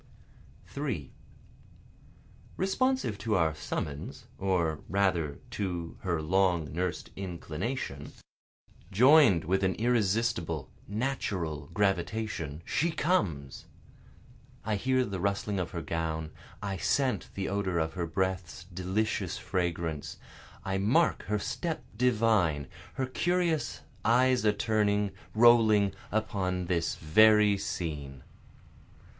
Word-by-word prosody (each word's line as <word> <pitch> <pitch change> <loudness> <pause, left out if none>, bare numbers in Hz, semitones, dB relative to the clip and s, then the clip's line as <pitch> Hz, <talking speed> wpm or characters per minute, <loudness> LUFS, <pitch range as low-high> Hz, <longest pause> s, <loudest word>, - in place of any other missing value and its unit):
3 125 - -4 1.4
Responsive 195 - 0
to 110 -2 0
our 80 -4 +2
summons, 75 -1 -5
Or 85 -5 +1
rather 90 -7 +1
to 90 -4 -3
her 85 -4 -1
long 85 -4 +1
nurs'd 90 +1 -3
inclination, 85 - -4 0.8
Join'd 125 - +6
with 95 +4 +1
an 95 0 +2
irresistible, 105 - 0 0.2
natural 95 - -2
gravitation, 95 -5 -1
She 165 +4 +1
comes! 90 - -1 1.0
I 110 0 0
hear 130 +4 +1
the 100 -4 -4
rustling 100 +2 -1
of 90 -2 -2
her 85 -2 -5
gown, 80 -1 -3 0.3
I 100 -2 -2
scent 130 +6 0
the 95 - -2
odor 95 -3 -1
of 80 -1 0
her 85 -2 -2
breath's 90 -1 -2
delicious 95 +4 -2
fragrance, 85 -4 -2 0.5
I 95 0 -1
mark 130 - +2
her 105 +1 +1
step 120 +10 -3
divine, 105 - +2 0.3
her 130 - 0
curious 160 - 0 0.2
eyes 125 +1 +3
a 105 - +6
turning, 105 -2 +1 0.2
rolling, 110 -3 +6 0.2
Upon 95 -4 -1
this 85 -2 0
very 105 +5 +5
scene. 75 -8 -4
95 Hz, 105 wpm, -29 LUFS, 85-110 Hz, 1.4 s, Join'd